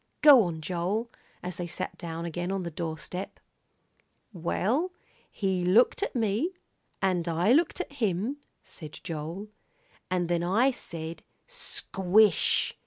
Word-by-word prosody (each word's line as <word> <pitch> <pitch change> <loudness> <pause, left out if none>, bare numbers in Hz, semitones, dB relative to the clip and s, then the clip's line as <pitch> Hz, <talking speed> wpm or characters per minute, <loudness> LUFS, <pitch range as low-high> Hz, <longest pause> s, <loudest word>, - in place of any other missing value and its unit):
"Go 285 -5 +10
on, 165 -2 -4
Joel," 185 +8 -2 0.3
as 180 -1 -4
they 175 - -3
sat 170 - -4
down 165 -1 -5
again 175 +2 -3
on 195 -1 -1
the 170 - -4
doorstep. 170 +3 -5 0.9
"Well, 220 - 0 0.4
he 190 -3 -1
looked 210 - +4
at 405 - -2
me, 230 - 0 0.5
and 180 -3 +1
I 170 +6 +2
looked 330 +5 +2
at 360 - -4
him," 220 +1 -1 0.3
said 155 -3 -9
Joel, 165 +5 -5 0.6
"and 180 -2 0
then 170 0 +1
I 225 +10 +3
said 165 -8 -5 0.2
'Squish!' 215 - +2
185 Hz, 130 wpm, -28 LUFS, 170-225 Hz, 0.9 s, Go